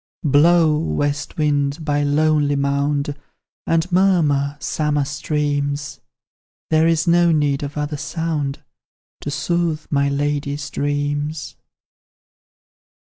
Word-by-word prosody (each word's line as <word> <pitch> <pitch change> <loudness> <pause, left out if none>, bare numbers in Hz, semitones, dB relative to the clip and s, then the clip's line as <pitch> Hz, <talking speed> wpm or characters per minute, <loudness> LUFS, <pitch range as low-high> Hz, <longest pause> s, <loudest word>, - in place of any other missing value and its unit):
Blow, 155 +1 +4
west 145 -2 -2
wind, 145 0 0
by 145 -1 +1
the 145 - 0
lonely 150 -1 +2
mound, 140 +1 0 0.5
And 165 +2 +1
murmur, 155 -7 +2
summer 150 -1 0
streams 145 0 -2 0.7
There 160 +1 +4
is 165 -1 +2
no 170 0 +4
need 145 -3 +1
of 145 +1 -5
other 150 0 -2
sound 155 -2 -3 0.6
To - - -5
soothe 160 +2 -1
my 140 -1 +2
lady's 145 0 -2
dreams. 145 +1 -2
145 Hz, 105 wpm, -20 LUFS, 145-155 Hz, 0.7 s, Blow